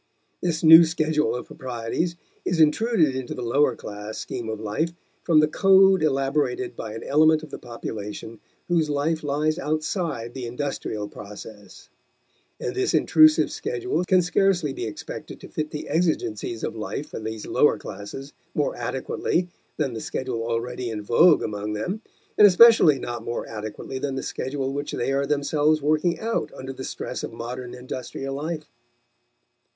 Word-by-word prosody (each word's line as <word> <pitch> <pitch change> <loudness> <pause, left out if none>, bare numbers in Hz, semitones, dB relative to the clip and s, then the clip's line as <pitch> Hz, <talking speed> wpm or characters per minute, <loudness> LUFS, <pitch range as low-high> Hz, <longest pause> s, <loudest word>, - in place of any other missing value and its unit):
This 170 -2 -1
new 160 +1 +10
schedule 155 -3 +1
of 125 - -5
proprieties 130 +7 -3 0.3
is 175 -2 -1
intruded 160 - +3
into 130 -2 -4
the 125 - -5
lower 130 +2 +2
class 105 +1 -7
scheme 120 -3 -5
of 110 -1 -4
life 110 +11 -2 0.3
from 155 -2 +4
the 155 - +4
code 195 +2 +5
elaborated 150 - 0
by 110 -1 -6
an 115 - -7
element 155 +2 +4
of 155 - -10
the - - -6
population 110 -2 -7 0.3
whose 165 -3 +1
life 150 +3 0
lies 150 +3 0
outside 155 - -2
the 125 -2 -5
industrial 120 -5 -4
process; 105 0 -11 0.7
and - - -3
this 385 0 0
intrusive 310 0 +5
schedule 395 - -2
can 185 0 +4
scarcely 180 -4 +2
be 120 - -4
expected 105 - -8
to - - -11
fit 155 0 -4
the 150 - -6
exigencies 145 - -1
of - - -3
life 115 +6 -5
for - - -6
these 110 -1 -5
lower - - +3
classes 135 +7 -8 0.2
more 145 - 0
adequately 130 +8 -2 0.3
than 140 -5 -1
the 110 - -5
schedule 125 -3 -3
already 120 +1 -3
in 105 -2 -4
vogue 155 - +5
among 105 0 -3
them, 180 - -3 0.4
and 210 - +10
especially 195 -6 +7
not 120 -2 -5
more 120 - -3
adequately 110 +4 -6
than 135 0 -2
the 135 - -3
schedule 135 0 -3
which 145 +1 -4
they 125 - -1
are 140 0 0
themselves 150 +1 +2
working 155 +3 +1
out 230 +1 -2
under 135 0 -7
the 130 - -8
stress - - -5
of - - -5
modern 120 +2 -6
industrial 130 +2 -6
life. 155 +2 -4
140 Hz, 160 wpm, -24 LUFS, 120-160 Hz, 0.7 s, new